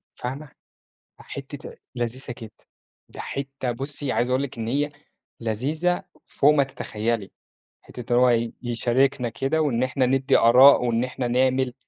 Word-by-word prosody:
فاهمة، 135 Hz, +5 st, -5 dB, 0.7 s
أ -, -, -13 dB
حتّة -, -, -8 dB, 0.2 s
لذيذة 120 Hz, +2 st, -3 dB
كده، 115 Hz, -3 st, -9 dB, 0.6 s
ده -, -, -13 dB
حتّة 135 Hz, -2 st, -4 dB
بُصي 135 Hz, +2 st, -4 dB
عايز 120 Hz, +1 st, 0 dB
أقول 130 Hz, +2 st, +1 dB
لِك 125 Hz, -3 st, -7 dB
إن 110 Hz, 0 st, -4 dB
هي 145 Hz, +4 st, 0 dB, 0.5 s
لذيذة 145 Hz, +11 st, -1 dB, 0.2 s
فوق 145 Hz, +2 st, +3 dB
ما 140 Hz, -2 st, +4 dB
تتخيّلي، 115 Hz, -5 st, -3 dB, 0.5 s
حتّة 120 Hz, 0 st, -6 dB
إن 120 Hz, -, +5 dB
هو 120 Hz, -2 st, +3 dB
يشاركنا 120 Hz, +2 st, +1 dB
كده 135 Hz, +7 st, -1 dB
وإن 130 Hz, -5 st, +1 dB
إحنا 130 Hz, 0 st, +1 dB
ندّي 135 Hz, +1 st, +3 dB
آراء 125 Hz, +3 st, +7 dB
وإن 115 Hz, 0 st, +1 dB
إحنا 125 Hz, -1 st, -3 dB
نعمل، 130 Hz, +1 st, +1 dB
125 Hz, 145 wpm, -24 LUFS, 120-135 Hz, 0.7 s, آراء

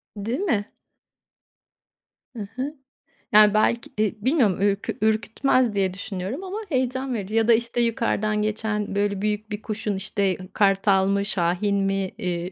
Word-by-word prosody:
Değil 225 Hz, -, -3 dB
mi? 225 Hz, -, -1 dB, 1.6 s
Hı 205 Hz, -3 st, -5 dB
hı. 280 Hz, +4 st, -3 dB, 0.6 s
Yani, 210 Hz, 0 st, +7 dB
belki, 235 Hz, +2 st, +1 dB
e, 215 Hz, 0 st, -1 dB
bilmiyorum 250 Hz, -, +2 dB
ür 200 Hz, -1 st, +3 dB, 0.2 s
ürkütmez 220 Hz, +2 st, +2 dB
diye 190 Hz, -2 st, +1 dB
düşünüyorum 195 Hz, -, -5 dB
ama 380 Hz, +3 st, -5 dB
heyecan 260 Hz, -1 st, -1 dB
verici. 215 Hz, 0 st, -4 dB
Ya 225 Hz, 0 st, +3 dB
da 235 Hz, -, +7 dB
işte 235 Hz, +1 st, 0 dB
yukarıdan 215 Hz, -3 st, 0 dB
geçen 210 Hz, -1 st, -2 dB
böyle 200 Hz, -1 st, 0 dB
büyük 210 Hz, +1 st, -2 dB
bir 210 Hz, +1 st, -4 dB
kuşun 215 Hz, -2 st, -3 dB
işte 190 Hz, 0 st, -1 dB, 0.2 s
kartal 195 Hz, -1 st, +3 dB
mı, 200 Hz, 0 st, +1 dB
şahin 195 Hz, +1 st, 0 dB
mi, 195 Hz, -1 st, 0 dB
iii, 180 Hz, 0 st, -3 dB
210 Hz, 145 wpm, -24 LUFS, 195-230 Hz, 1.6 s, Yani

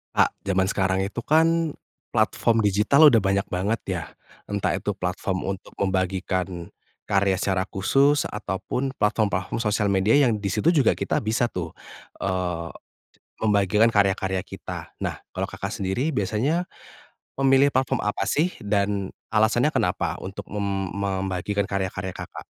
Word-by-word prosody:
Kak, -, -, +3 dB
jaman 95 Hz, -1 st, +1 dB
sekarang 95 Hz, -1 st, +1 dB
itu 115 Hz, +4 st, -6 dB
kan, 165 Hz, +2 st, +3 dB, 0.4 s
platform 115 Hz, -1 st, +2 dB
digital 105 Hz, +9 st, +5 dB
udah 115 Hz, -7 st, +5 dB
banyak 100 Hz, 0 st, +1 dB
banget 100 Hz, +5 st, -1 dB
ya. -, -, -2 dB, 0.5 s
Entah 100 Hz, -1 st, 0 dB
itu 105 Hz, -, -2 dB
platform 95 Hz, 0 st, -3 dB
untuk 95 Hz, -, -17 dB
membagikan 95 Hz, -2 st, -1 dB, 0.4 s
karya 100 Hz, -1 st, +2 dB
secara 95 Hz, -2 st, +1 dB
khusus, 140 Hz, +10 st, +2 dB
ataupun 105 Hz, +6 st, -3 dB
platform-platform 105 Hz, -3 st, 0 dB
sosial 105 Hz, -1 st, +1 dB
media 100 Hz, +7 st, +3 dB
yang 115 Hz, -, +2 dB
di 100 Hz, -2 st, -3 dB
situ 125 Hz, -, -1 dB
juga 145 Hz, -, +5 dB
kita -, -, -1 dB
bisa 115 Hz, +3 st, +1 dB
tuh, 85 Hz, -7 st, -5 dB, 0.5 s
eee, 90 Hz, -3 st, -2 dB, 0.7 s
membagikan 105 Hz, +1 st, +3 dB
karya-karya 95 Hz, -3 st, +1 dB
kita. -, -, -8 dB
Nah, -, -, -2 dB, 0.2 s
kalau -, -, -3 dB
Kakak, -, -, -5 dB
sendiri, 110 Hz, +11 st, -1 dB
biasanya, 125 Hz, -, 0 dB, 0.7 s
memilih 135 Hz, +1 st, +5 dB
platform 130 Hz, 0 st, +1 dB
apa 105 Hz, -, -1 dB
sih, 170 Hz, +5 st, +1 dB
dan 100 Hz, -1 st, 0 dB, 0.2 s
alasannya 115 Hz, +6 st, +3 dB
kenapa 90 Hz, -7 st, 0 dB
untuk 95 Hz, +1 st, -7 dB
mem 100 Hz, -2 st, -2 dB
membagikan 95 Hz, 0 st, -1 dB
karya-karya 95 Hz, -1 st, -3 dB
Kakak? -, -, -8 dB
100 Hz, 135 wpm, -24 LUFS, 95-115 Hz, 0.7 s, digital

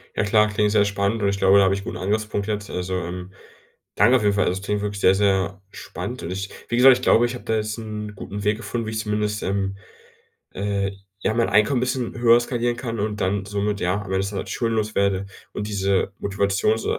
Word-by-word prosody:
Ja -, -, +1 dB
klar, 105 Hz, +1 st, +3 dB
klingt 105 Hz, 0 st, +1 dB
sehr 105 Hz, -1 st, +4 dB
spannend 100 Hz, +2 st, -1 dB
und 100 Hz, -, +2 dB
ich 100 Hz, -, -1 dB
glaube, 95 Hz, +1 st, +5 dB
da 100 Hz, -, +6 dB
habe 95 Hz, 0 st, +3 dB
ich 100 Hz, -, -2 dB
'n -, -, -11 dB
guten -, -, -5 dB
Angriffspunkt 105 Hz, +1 st, -1 dB
jetzt, 105 Hz, -1 st, -3 dB
also, 90 Hz, +1 st, -3 dB
ähm, 90 Hz, +1 st, -5 dB, 0.6 s
danke 120 Hz, +6 st, +5 dB
auf 110 Hz, -, -3 dB
jeden 100 Hz, -1 st, +3 dB
Fall, 100 Hz, -, +2 dB
also, 90 Hz, +2 st, 0 dB
das 95 Hz, -, -10 dB
klingt 105 Hz, 0 st, -1 dB
wirklich 100 Hz, -1 st, -3 dB
sehr, 95 Hz, -, +5 dB
sehr 95 Hz, -1 st, +1 dB
spannend -, -, -7 dB
und 85 Hz, -, -4 dB
ich 95 Hz, +1 st, -4 dB, 0.2 s
wie -, -, 0 dB
gesagt, 125 Hz, 0 st, +8 dB
ich 125 Hz, -, -10 dB
glaube, 120 Hz, -, +5 dB
ich 120 Hz, -, -2 dB
habe -, -, -10 dB
da 110 Hz, -, 0 dB
jetzt 110 Hz, 0 st, -2 dB
'n 105 Hz, -2 st, -6 dB
guten 100 Hz, +1 st, -6 dB
Weg 105 Hz, +1 st, +1 dB
gefunden, 115 Hz, -1 st, -4 dB
wie -, -, -3 dB
ich 110 Hz, -, -2 dB
zumindest, 105 Hz, -1 st, -1 dB
ähm, 95 Hz, 0 st, -1 dB, 0.8 s
äh, 100 Hz, -1 st, -1 dB, 0.3 s
ja, 110 Hz, -, +1 dB
mein 115 Hz, 0 st, +1 dB
Einkommen 110 Hz, +5 st, +3 dB
bisschen 125 Hz, -1 st, -2 dB
höher 120 Hz, 0 st, +6 dB
skalieren 120 Hz, 0 st, -1 dB
kann 115 Hz, -4 st, -4 dB
und 105 Hz, 0 st, -2 dB
dann 95 Hz, +1 st, 0 dB
somit 100 Hz, 0 st, -2 dB
ja 90 Hz, +2 st, +1 dB
am 105 Hz, -1 st, -4 dB
Ende 95 Hz, 0 st, 0 dB
des 100 Hz, 0 st, -1 dB
Tages 100 Hz, -2 st, -5 dB
schuldenlos 110 Hz, -2 st, -1 dB
werde 100 Hz, -1 st, +1 dB, 0.3 s
und 105 Hz, -, -4 dB
diese 100 Hz, -1 st, 0 dB
Motivations 100 Hz, +2 st, 0 dB
105 Hz, 235 wpm, -23 LUFS, 100-110 Hz, 0.8 s, gesagt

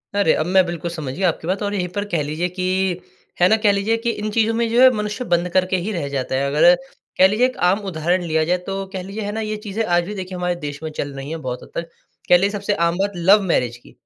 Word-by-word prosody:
अरे, 200 Hz, -5 st, +3 dB
अब 155 Hz, -, 0 dB
मैं 185 Hz, +1 st, +4 dB
बिल्कुल 170 Hz, -1 st, -4 dB
समझ 155 Hz, -6 st, -5 dB
गया 185 Hz, +5 st, +1 dB
आपकी 160 Hz, -, -5 dB
बात 190 Hz, +3 st, -1 dB
और 205 Hz, 0 st, -2 dB
यहीं 180 Hz, -3 st, -1 dB
पर 205 Hz, 0 st, -1 dB
कह 170 Hz, -5 st, 0 dB
लीजिए 155 Hz, +4 st, -2 dB
कि, 185 Hz, 0 st, -1 dB, 0.4 s
है 180 Hz, -, +7 dB
ना? 220 Hz, -, +4 dB
कह 210 Hz, -2 st, +3 dB
लीजिए 200 Hz, +3 st, +1 dB
कि 235 Hz, -, +1 dB
इन 215 Hz, -1 st, -4 dB
चीज़ों 225 Hz, +1 st, +2 dB
में 230 Hz, 0 st, 0 dB
जो 235 Hz, +2 st, +3 dB
है 260 Hz, -, +9 dB
मनुष्य 210 Hz, +4 st, -3 dB
बंद 175 Hz, +1 st, +1 dB
करके 185 Hz, 0 st, +2 dB
ही 185 Hz, +5 st, -3 dB
रह 170 Hz, -8 st, -3 dB
जाता 135 Hz, -1 st, -2 dB
है। 135 Hz, +1 st, 0 dB
अगर 150 Hz, -, +5 dB, 0.4 s
कह 185 Hz, -, +7 dB
लीजिए 215 Hz, +6 st, +2 dB
एक 255 Hz, -, -2 dB
आम 195 Hz, +3 st, +2 dB
उदाहरण 175 Hz, +2 st, 0 dB
लिया 160 Hz, -2 st, +1 dB
जाए 180 Hz, +3 st, +1 dB
तो 195 Hz, 0 st, -3 dB
कह 190 Hz, -, -3 dB
लीजिए 200 Hz, +3 st, -6 dB
है 205 Hz, -, -3 dB
ना? 220 Hz, +1 st, -3 dB
ये 215 Hz, 0 st, -3 dB
चीज़ें 210 Hz, +1 st, -3 dB
आज 175 Hz, -2 st, +2 dB
भी 205 Hz, -, -6 dB
देखिए 185 Hz, -1 st, -6 dB
हमारे 180 Hz, 0 st, -1 dB
देश 145 Hz, 0 st, -5 dB
में 160 Hz, -, -3 dB
चल 145 Hz, -2 st, -5 dB
रही 135 Hz, +1 st, -7 dB
है 165 Hz, -, -4 dB
बहुत 125 Hz, -1 st, -4 dB
हद -, -, -14 dB
तक 170 Hz, 0 st, -4 dB, 0.4 s
कह 175 Hz, -, +8 dB
लीजिए 195 Hz, +3 st, +1 dB
सबसे 205 Hz, 0 st, -1 dB
आम 170 Hz, +1 st, -1 dB
बात 200 Hz, +1 st, 0 dB
लव 190 Hz, +5 st, +5 dB
मैरेज 120 Hz, -4 st, 0 dB
की, 120 Hz, -, -18 dB
185 Hz, 280 wpm, -21 LUFS, 170-205 Hz, 0.4 s, है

